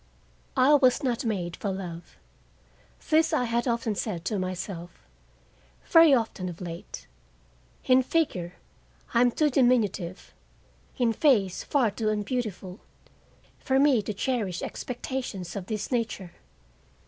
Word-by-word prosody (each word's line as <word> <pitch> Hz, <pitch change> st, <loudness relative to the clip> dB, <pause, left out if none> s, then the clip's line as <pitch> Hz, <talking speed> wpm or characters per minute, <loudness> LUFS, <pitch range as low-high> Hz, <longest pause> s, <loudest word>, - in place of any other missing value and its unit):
I 260 Hz, +3 st, +5 dB
was 270 Hz, -1 st, +4 dB
not 245 Hz, -2 st, -1 dB
made 180 Hz, -6 st, -2 dB
for 205 Hz, -, -4 dB
love. 180 Hz, -3 st, -7 dB, 0.9 s
This 320 Hz, +1 st, +4 dB
I -, -, +2 dB
had 235 Hz, +1 st, -1 dB
often 230 Hz, -2 st, 0 dB
said 185 Hz, -4 st, -4 dB
to 210 Hz, -3 st, -1 dB
myself; 180 Hz, -1 st, -6 dB, 0.8 s
very 330 Hz, -2 st, +7 dB
often 225 Hz, -7 st, 0 dB
of 175 Hz, -, -9 dB
late. 170 Hz, -2 st, -8 dB, 0.8 s
In 255 Hz, 0 st, +5 dB
figure 245 Hz, -, -1 dB, 0.6 s
I 235 Hz, -, +4 dB
am 245 Hz, -, +5 dB
too 300 Hz, +4 st, +1 dB
diminutive, 225 Hz, -9 st, +1 dB, 0.6 s
in 235 Hz, -3 st, +2 dB
face 215 Hz, -, +2 dB
far 255 Hz, -7 st, +1 dB
too 215 Hz, +1 st, -2 dB
unbeautiful, 210 Hz, -3 st, -3 dB, 0.8 s
for 265 Hz, -1 st, 0 dB
me 275 Hz, -4 st, +4 dB
to 205 Hz, -, -4 dB
cherish 205 Hz, -4 st, -2 dB
expectations 245 Hz, -8 st, -5 dB
of 190 Hz, -3 st, -5 dB
this 215 Hz, +1 st, -4 dB
nature. 225 Hz, -7 st, -2 dB
225 Hz, 125 wpm, -27 LUFS, 185-255 Hz, 0.9 s, very